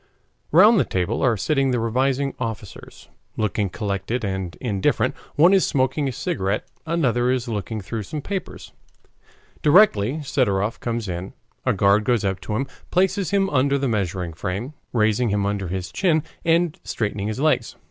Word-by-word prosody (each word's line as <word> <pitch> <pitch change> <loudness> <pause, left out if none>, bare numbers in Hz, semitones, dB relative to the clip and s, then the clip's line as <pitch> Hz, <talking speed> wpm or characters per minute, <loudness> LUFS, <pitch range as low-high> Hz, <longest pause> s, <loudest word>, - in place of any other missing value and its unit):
Round 205 +7 +7
the - - +4
table 95 +5 -1
are 120 -4 +3
sitting 135 +5 +1
the 125 -2 +1
revising 130 +4 0
officers, 110 -5 -7 0.3
looking 105 -1 0
collected 105 +4 -3
and 95 -3 -3
indifferent. 100 -7 0 0.2
One 170 +6 +6
is 195 - +5
smoking 135 +1 +1
a - - -1
cigarette; 100 -3 -2 0.2
another 125 -7 +1
is 125 -1 0
looking 105 -1 -3
through 110 +4 -4
some 150 +10 -5
papers. 190 +6 -6 0.9
Directly 150 - +4
Sidorov 115 -7 0
comes 115 -2 -3
in, 90 +1 -5 0.3
a - - +4
guard 100 +2 +3
goes 115 -2 +1
up 95 -1 -1
to 105 - -4
him, 135 +5 0 0.2
places 190 +1 +1
him 195 -1 +2
under 140 0 +2
the 135 0 -1
measuring 95 -6 -2
frame, 100 - -4 0.2
raising 110 +1 +2
him 100 -1 0
under 100 -2 -2
his 90 0 -4
chin, 160 -5 +2 0.2
and 165 -1 +2
straightening 105 -2 -2
his 110 +3 -3
legs. 145 -6 +1
115 Hz, 160 wpm, -23 LUFS, 100-140 Hz, 0.9 s, Round